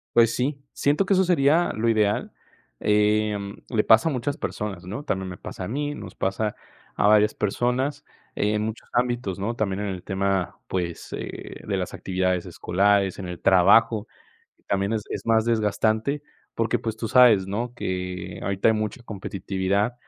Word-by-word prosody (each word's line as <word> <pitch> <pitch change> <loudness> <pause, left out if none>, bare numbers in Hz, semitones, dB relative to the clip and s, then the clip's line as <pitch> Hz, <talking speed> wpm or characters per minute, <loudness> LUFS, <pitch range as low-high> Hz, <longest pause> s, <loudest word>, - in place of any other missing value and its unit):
Pues 115 -1 +5
sí, 140 +3 -1
siento 145 +7 +2
que 195 - +2
eso 190 0 +4
sería 170 -1 +3
lo 110 +2 0
ideal, 105 -2 +1 0.5
em, 105 -1 +1
le 110 -4 +1
pasa 110 +9 +5
a - - -1
muchas 140 +3 -2
personas, 100 -4 -4
¿no? 105 +10 -5
También 95 -9 -2
me 90 - -7
pasa 95 - -7
a - - -5
mí. 145 +5 -2
Nos - - -9
pasa 105 +2 -1 0.4
a - - +3
varias 105 0 +5
personas 125 +7 -1 0.3
en 105 +1 +1
muchos 110 +1 -5
ámbitos, 120 -6 0
¿no? 105 +4 -2
También 100 -3 -1
en 105 - -2
el 95 -2 -4
tema, 95 -1 -1
pues, 85 -2 -3
eh, - - -7
de - - 0
las - - -3
actividades 95 -1 -1
escolares, 95 +2 +1
en 95 - -5
el 90 -1 -6
trabajo, 100 +4 +5 0.6
también 100 +2 0
es 110 -2 -1
es - - -5
más 115 -1 +3
desgastante, 110 +5 +1 0.3
porque 115 -1 0
pues 110 -1 -3
tú 115 - -3
sabes, 110 -5 +6
¿no? 115 +5 -3
Que 90 -3 -4
ahorita 100 +2 +2
hay - - +4
mucha 110 +4 -3
competitividad 100 +1 -2
105 Hz, 170 wpm, -24 LUFS, 95-120 Hz, 0.6 s, sabes